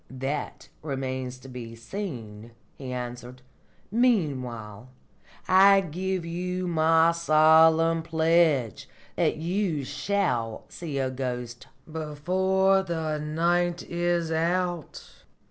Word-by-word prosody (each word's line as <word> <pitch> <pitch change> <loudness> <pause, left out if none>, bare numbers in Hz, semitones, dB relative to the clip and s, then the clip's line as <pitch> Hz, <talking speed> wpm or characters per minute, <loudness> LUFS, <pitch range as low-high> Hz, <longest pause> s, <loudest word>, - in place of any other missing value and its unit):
"That 135 +3 -5
remains 130 -3 -4
to 130 - -14
be 120 -3 -8
seen," 115 - -7 0.2
he 130 -2 -7
answered. 125 0 -7 0.5
"Meanwhile, 130 - -1 0.6
I 195 +1 +6
give 185 +1 -3
you 180 +2 -3
my 165 0 +4
solemn 160 0 +4
pledge 160 - +1 0.3
that - - +1
you 170 -2 -1
shall 140 - -2
see 155 -5 -6
a 130 -1 -1
ghost 125 -2 -5 0.2
before 185 +5 +1
the 160 -4 -3
night 170 +3 0
is 175 -1 -1
out." 175 0 -2
160 Hz, 95 wpm, -26 LUFS, 130-175 Hz, 0.6 s, I